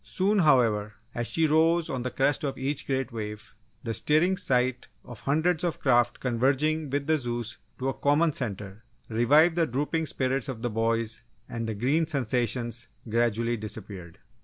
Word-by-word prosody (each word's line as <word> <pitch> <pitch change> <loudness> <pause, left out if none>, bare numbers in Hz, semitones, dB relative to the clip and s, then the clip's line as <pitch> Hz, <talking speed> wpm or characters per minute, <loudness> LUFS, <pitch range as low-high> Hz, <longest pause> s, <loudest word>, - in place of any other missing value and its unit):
Soon, 200 +2 +1
however, 115 - +3 0.2
as 120 0 -2
she 165 - +2
rose 160 +2 +3
on 130 - -3
the 130 - -2
crest 135 +3 0
of 140 -2 -2
each 135 +2 -2
great 135 -1 -1
wave, 105 -1 -6 0.3
the 115 -3 -3
stirring 155 - +3
sight 130 -8 0 0.2
of 120 -4 -10
hundreds 160 +4 +1
of 170 -3 -1
craft 120 -2 +2
converging 135 +5 +1
with 140 +1 -1
the 155 0 +2
Zeus 120 -2 -4 0.2
to 130 - -3
a 135 - 0
common 150 +2 +2
centre, 105 -4 -5 0.3
revived 145 +9 +4
the 165 -2 +2
drooping 150 +5 -1
spirits 130 -1 -1
of 115 -4 -6
the 120 - -1
boys 115 0 -1 0.3
and 115 -1 -4
the 110 - -3
"green" 140 +9 +1
sensations 120 -3 -1 0.2
gradually 115 +1 0
disappeared. 100 -5 -8
130 Hz, 165 wpm, -27 LUFS, 115-150 Hz, 0.3 s, revived